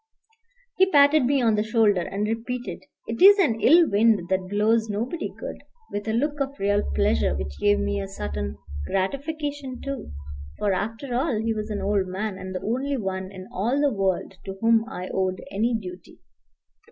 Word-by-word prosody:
He 380 0 +5
patted 285 -2 +5
me 270 0 +2
on 225 -2 +4
the 210 - +2
shoulder, 215 -4 +3
and 200 +4 -2
repeated, 240 +3 -4 0.2
"It 230 - -5
is 400 +2 +9
an 235 - +2
ill 330 +7 +6
wind 205 -3 +3
that 190 -1 0
blows 220 +2 +2
nobody 235 +11 -3
good," - - -7 0.3
with 205 +1 -4
a - - +1
look 295 +5 0
of 275 +1 -2
real 205 +1 +2
pleasure 70 +1 +2
which 70 -1 -5
gave 70 - +3
me 65 0 -1
a - - -5
certain 70 0 -5 0.3
gratification 280 +5 -3
too; 275 - -6 0.5
for, 205 -2 +1
after 225 +7 -3
all, 255 -1 0
he 225 +1 0
was 215 0 -4
an 210 - -3
old 200 -2 +1
man, 190 +1 -4
and 185 0 -7
the 185 - -3
only 265 +5 -1
one 190 -3 -4
in 185 -1 -10
all 235 +9 0
the 285 -3 +2
world 195 -1 -1
to 195 0 -6
whom 225 0 +3
I 185 -6 -6
owed 185 -1 0
any 225 +4 +1
duty. 180 -2 -10
215 Hz, 185 wpm, -25 LUFS, 190-255 Hz, 0.5 s, is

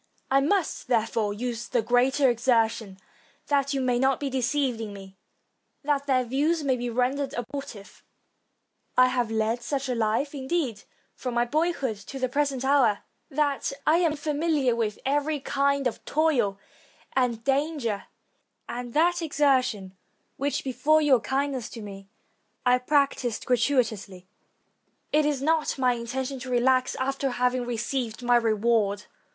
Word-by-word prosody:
I 270 +1 +5
must, 345 +4 0
there 230 -3 +2
fore, 225 -2 -1
use 235 +2 -4
the 240 -3 0
greater 255 +4 +3
exertion, 230 -4 +1 0.5
that 280 -1 +2
you - - 0
may 250 -2 +1
not 265 0 +2
be 280 -2 -3
deceived 260 -2 0
in 210 -2 -5
me, 195 -1 -11 0.7
and 295 - -8
that 285 0 0
their 255 -2 +3
views 295 +6 0
may 265 -2 +2
be 245 0 -3
rendered 255 +4 -1
abortive. 240 -4 -7 0.9
I 255 0 +6
have 245 -3 0
led 225 +2 0
such 275 +2 -2
a 255 - -1
life, 230 +5 0
indeed, 265 -5 -2 0.3
from 250 -2 -5
my 240 0 +3
boy 310 +7 +1
hood 260 -10 -3
to 210 +7 -9
the 255 -1 0
present 275 -1 -1
hour, 265 -7 +3 0.3
that 285 -2 0
I 315 +2 +5
am 335 -3 +2
famiHar 295 -3 0
with 220 -3 -1
every 290 +2 0
kind 280 0 0
of 245 - -2
toil 270 -11 +1 0.6
and 245 -3 +1
danger; 275 -6 -1 0.6
and 245 -1 -6
that 345 +3 +3
exertion, 260 - +1 0.4
which, 280 +1 -2
before 285 +4 +2
your 270 -4 +5
kindness 265 -1 -2
to 230 - -9
me, 195 -1 -9 0.6
I 250 0 +4
practiced 265 -3 0
gratuitously, 225 -7 0 0.9
it 300 0 +3
is 280 -3 -1
not 315 0 +1
my 255 -2 +3
intention 255 +3 -4
to 255 +1 -7
relax 255 +1 +2
after 270 +1 -1
having 250 0 0
received 240 0 -3
my 245 0 +4
reward. 215 -2 +1
255 Hz, 150 wpm, -26 LUFS, 235-280 Hz, 0.9 s, I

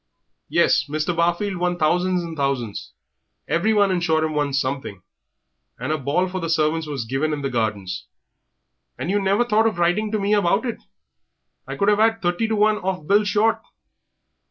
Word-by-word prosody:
"Yes, 140 - +3
Mr. 155 +4 -2
Barfield 175 +4 0
won 175 0 -1
thousands 180 +3 +1
and 165 -1 -6
thousands, 135 -7 -3 0.6
everyone 200 +5 +2
in 185 - +1
Shoreham 160 -2 +1
won 145 -1 0
something, 130 -8 -3 0.7
and - - -3
a 155 - +1
ball 145 +8 0
for 185 0 -4
the 165 - -3
servants 160 0 +1
was 140 -6 -4
given 135 +6 -1
in 145 -1 -4
the 135 - -2
Gardens." 105 -6 -2 0.9
"And 180 - -3
you 205 0 +1
never 200 +5 +2
thought 220 -1 +3
of 215 - -2
writing 180 +5 +1
to 215 - 0
me 200 +1 +1
about 200 +3 +2
it! 235 - -3 0.9
I - - -5
could 200 - 0
have 210 0 +4
'ad 225 +1 +3
thirty 175 +4 0
to 220 - 0
one 215 0 +3
off 185 -5 -3
Bill 205 +5 +4
Short. 210 +2 +2
175 Hz, 180 wpm, -22 LUFS, 150-205 Hz, 0.9 s, have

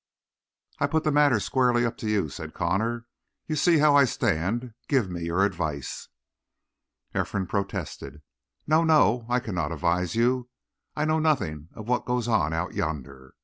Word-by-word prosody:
"I 140 - +2
put 160 +2 0
the 155 - +1
matter 145 -5 +4
squarely 120 +2 +2
up 115 0 -2
to 110 - -4
you," 100 -6 +1
said 80 +2 -8
Connor. 110 +7 -1 0.4
"You 155 - -2
see 170 +1 +4
how 150 -1 +5
I 140 -1 +7
stand. 115 +3 -1
Give 125 -10 +1
me 85 -1 -4
your 85 +4 +2
advice!" 80 -8 -4 1.1
Ephraim 95 -2 -1
protested. 90 -6 -4 0.4
"No, 155 +2 +3
no! 125 -8 +3
I 125 +1 +2
cannot 85 -10 -3
advise 85 +2 0
you. 125 +1 +1 0.5
I 150 - 0
know 155 +1 +2
nothing 85 - 0
of 110 -1 -9
what 125 -2 0
goes 125 -1 -1
on 105 -9 +2
out 80 +2 -2
yonder. 70 -4 -5
110 Hz, 160 wpm, -26 LUFS, 85-130 Hz, 1.1 s, I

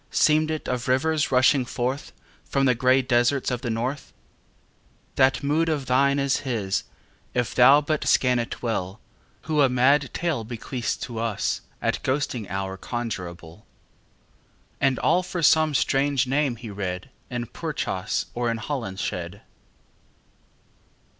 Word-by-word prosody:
Seemed 155 0 +3
it 155 -1 -3
of 125 0 -2
rivers 150 +4 +1
rushing 130 +1 +4
forth 125 +3 -3 0.3
From 135 -1 +1
the 130 - +4
grey 130 +2 +3
deserts 125 +2 +2
of 125 -1 -2
the 120 - -3
north? 125 +5 -3 1.0
That 130 -2 +3
mood 155 +4 +1
of 145 -4 -1
thine 140 +2 +3
Is 140 -1 +1
his, 110 -8 -2 0.5
if 125 -2 0
thou 135 +4 +7
but 150 0 -2
scan 125 -1 +3
it 120 - -5
well, 105 -4 -2 0.4
Who 155 -2 +1
a 135 - +5
mad 130 +2 +3
tale 165 -9 -1
bequeaths 120 +1 -4
to 120 -3 -5
us 115 -3 -1 0.2
At - - 0
ghosting 130 -6 -2
hour 95 0 -3
conjurable 90 -6 -6 1.1
And 135 -2 +2
all 180 - +2
for 180 -1 -4
some 155 0 +4
strange 140 0 +2
name 135 -1 0
he 115 -1 -9
read 95 +4 -5 0.2
In 120 -1 -3
Purchas 110 - -3
or 120 0 -1
in 115 - -1
Holinshed. 100 - -4
125 Hz, 140 wpm, -24 LUFS, 115-140 Hz, 1.1 s, thou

